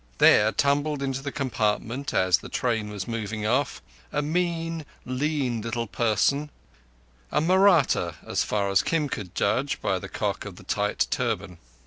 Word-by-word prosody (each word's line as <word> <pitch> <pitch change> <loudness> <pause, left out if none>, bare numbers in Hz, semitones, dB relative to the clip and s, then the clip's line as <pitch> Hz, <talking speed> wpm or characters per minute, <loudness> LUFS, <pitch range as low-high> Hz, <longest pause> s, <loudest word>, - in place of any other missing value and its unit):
There 105 +1 +6
tumbled 145 +1 +1
into 135 -1 -2
the 140 +1 -4
compartment, 125 0 -1
as 95 -1 +3
the - - -10
train 115 -4 -1
was 100 -2 -5
moving 110 -2 -3
off, 125 +6 0 0.3
a 145 - 0
mean, 165 0 -1 0.2
lean 130 -3 -1
little 115 +1 -2
person—a - - -2
Mahratta, 180 -2 +4
so - - -7
far 100 -2 0
as 95 - +4
Kim 160 -3 0
could 100 -8 -6
judge 140 +8 0
by 95 - 0
the - - -8
cock - - -2
of - - -8
the - - -13
tight 105 0 0
turban. 105 -8 -2
120 Hz, 150 wpm, -26 LUFS, 105-145 Hz, 0.3 s, There